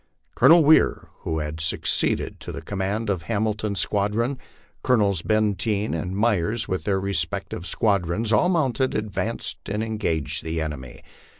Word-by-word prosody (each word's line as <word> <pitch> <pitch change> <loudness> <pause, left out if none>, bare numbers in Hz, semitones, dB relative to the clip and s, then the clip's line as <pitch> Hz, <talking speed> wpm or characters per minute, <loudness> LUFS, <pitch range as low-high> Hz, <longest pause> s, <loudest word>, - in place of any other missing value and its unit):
Colonel 165 0 +6
Weir, 155 +2 +4
who 80 - -3
had 75 +1 -4
succeeded 80 - 0
to - - -7
the - - -7
command 100 +3 -2
of 95 -4 -1
Hamilton's 105 -2 -1
squadron, 110 +6 0 0.4
Colonels 100 -8 +2
Bcnteen 105 0 0
and 90 +4 -3
Myers 105 0 +1
with 95 - -3
their 95 -2 +1
respective 90 -2 -3
squadrons, 100 +1 0
all 110 +12 +4
mounted, 135 -7 +1
advanced 105 -2 -3
and 105 +2 -1
engaged 105 - -1
the 80 0 -3
enemy. 75 -5 -6
105 Hz, 135 wpm, -24 LUFS, 90-110 Hz, 0.4 s, Colonel